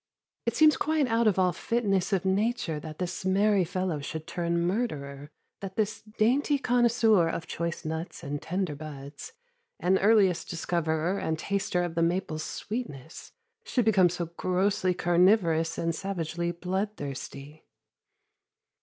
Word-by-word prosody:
It 235 - +1
seems 305 -2 +6
quite 310 +1 +1
out 230 -2 +2
of 205 - +3
all 180 -1 +3
fitness 200 -5 0
of 195 -2 +1
nature 190 -4 0
that 155 +1 -8
this 180 0 -4
merry 195 +1 +3
fellow 180 -2 -2
should 155 +2 -6
turn 170 -1 -1
murderer, 150 - -2 0.3
that 195 -1 -7
this 215 -1 -1 0.2
dainty 275 +6 +3
connoisseur 235 -8 +3
of 165 - -4
choice 170 0 -4
nuts 160 +2 -5
and 145 +1 -4
tender 180 -2 -2
buds, 145 - -9 0.5
and 190 +2 +2
earliest 200 -4 +3
discoverer 170 +1 -1
and 160 0 -1
taster 190 0 -1
of 175 -2 -3
the 165 - 0
maple's 165 -2 0
sweetness, 165 - -6 0.3
should 245 -4 0
become 190 -5 +5
so 175 0 -3
grossly 185 +2 0
carnivorous 175 -2 +3
and 165 0 0
savagely 170 -1 -3
bloodthirsty. 165 -6 -5
180 Hz, 135 wpm, -28 LUFS, 160-205 Hz, 0.5 s, seems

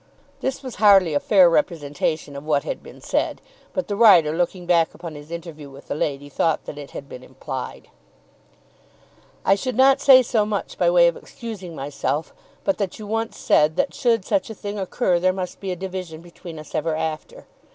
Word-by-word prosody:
This 265 +1 -3
was 255 -2 -7
hardly 195 -6 +6
a 145 - +2
fair 190 -1 +5
representation 155 -2 -1
of 140 - -7
what 150 -2 +1
had - - -4
been - - -14
said, - - -1 0.3
but 275 - -3
the 205 - -2
writer, 180 -9 +6
looking 175 +1 -1
back 170 -2 +2
upon 170 -1 -8
his 145 0 -11
interview 165 -4 -8
with 135 +1 -15
the - - -1
lady, 145 -1 -2
thought 155 +3 0
that 145 - -7
it 145 - -9
had 140 - -9
been 125 - -10
implied. 130 0 -7 1.6
I 195 - +5
should 250 +5 -2
not 265 +2 +5
say 260 -2 +8
so 225 -3 +1
much 210 -1 -4
by - - +4
way - - +6
of - - +1
excusing 205 -8 -8
myself, 145 +2 -3 0.3
but 290 -5 0
that 195 -3 -2
you 215 - -8
once 225 +2 -3
said, 150 +1 +3
that - - 0
should 230 -6 +1
such 285 -3 0
a 220 - -7
thing 205 0 -5
occur 185 -1 0
there 185 +1 +3
must 185 -1 -5
be 195 -2 -4
a - - -2
division 180 -3 -6
between 170 -1 -11
us 155 - -11
ever 160 0 -1
after. 160 - -5
175 Hz, 200 wpm, -22 LUFS, 155-215 Hz, 1.6 s, say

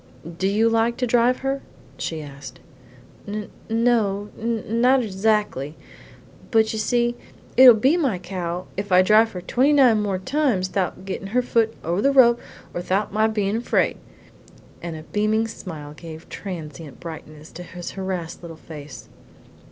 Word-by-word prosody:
Do 190 - +1
you 215 +3 +3
like 230 +1 +2
to 250 - 0
drive 245 +1 +2
her?" 275 0 -1 0.4
she 160 -2 -3
asked. 140 -1 -10 0.7
"N 210 0 -5 0.2
no, 220 -3 +1
not 235 +3 +1
erzackly; 200 - 0 0.7
but 220 -2 +3
you 220 - -2
see, 240 +2 +1 0.4
it'll 255 -2 +10
be 265 +10 +3
my 270 - +1
cow 180 -1 -4
if 200 0 -4
I 180 0 +6
drive 215 +3 +4
her 180 - -5
twenty 260 +10 +2
nine 250 -7 +5
more 200 -2 -1
times 245 -4 0
thout 190 -1 -1
her - - -15
gettin' 195 0 -5
her 250 +5 +1
foot 225 -2 +1
over 170 +4 0
the 275 - +3
rope 240 -3 +6 0.3
and 175 - -4
thout 195 +2 -1
my 215 +1 +3
bein' 210 -1 0
afraid," 240 - +1 0.8
and 170 -2 -5
a 155 - -8
beaming 215 +5 0
smile 155 -9 -8
gave 160 0 -10
a - - -23
transient 160 -6 -8
brightness 155 -2 -10
to 175 - -9
his 175 0 -7
harassed 190 -4 -4
little 165 -2 -9
face. 150 -4 -10
205 Hz, 160 wpm, -23 LUFS, 175-230 Hz, 0.8 s, it'll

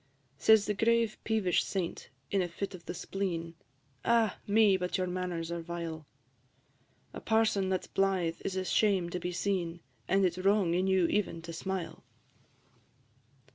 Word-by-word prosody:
Says 220 -2 +6
the 210 - 0
grave 230 +1 +2
peevish 210 -6 +1
Saint, 185 -4 -4 0.2
in 195 - +2
a 180 - 0
fit 195 +4 -5
of 180 -2 -10
the - - -3
spleen, 170 -3 -3 0.5
"Ah! 230 -2 +2
me, 205 -1 +5
but 180 -1 -1
your 185 - 0
manners 180 -2 -3
are 170 0 -3
vile: 165 -2 -6 1.1
A - - -7
parson 220 -4 +2
that 185 -1 0
's - - -11
blythe 190 -4 0
is 190 - -3
a 185 0 -1
shame 190 -3 +2
to 180 - -2
be 180 - -3
seen, 175 -2 -1 0.3
And 195 0 +3
it 180 - +2
's 180 - -8
wrong 195 -2 +3
in 185 +2 +1
you 190 -2 +3
even 170 -3 -1
to 165 0 -7
smile." 185 +1 -4
185 Hz, 170 wpm, -31 LUFS, 170-200 Hz, 1.1 s, Says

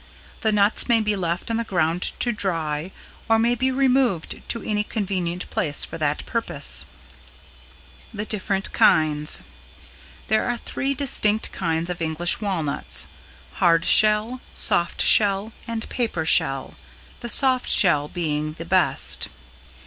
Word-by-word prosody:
The 220 - +1
nuts 210 +3 +3
may 235 -1 +5
be 210 -1 0
left 175 +2 -3
on 225 - 0
the 230 - -1
ground 175 -4 0
to 240 - +3
dry 165 -5 -3 0.4
or 225 - +5
may 235 +2 +2
be 255 +2 0
removed 260 -8 +1
to 230 - -1
any 210 -1 -1
convenient 185 -5 -3
place 145 -4 +2
for - - -9
that 150 -1 -1
purpose. 230 -1 -2 1.2
[Sidenote: - - -17
=The 210 +1 -3
Different 195 -2 -2
Kinds=] 150 -1 +2 0.9
There 220 +1 +1
are 240 0 -1
three 275 +3 -3
distinct 220 -6 0
kinds 165 -1 -2
of 175 - -6
English 165 +5 +1
Walnuts 175 -8 -1 0.6
hard 165 -1 +4
shell, 215 +4 +3
soft 170 0 +1
shell 205 +1 +2
and 230 -1 -4
paper 225 -10 -2
shell, 135 -3 +1 0.5
the 240 - -6
soft 255 +1 +1
shell 150 -6 +4
being 155 -3 -3
the 165 +1 -8
best. 185 +1 +1
195 Hz, 140 wpm, -23 LUFS, 165-225 Hz, 1.2 s, may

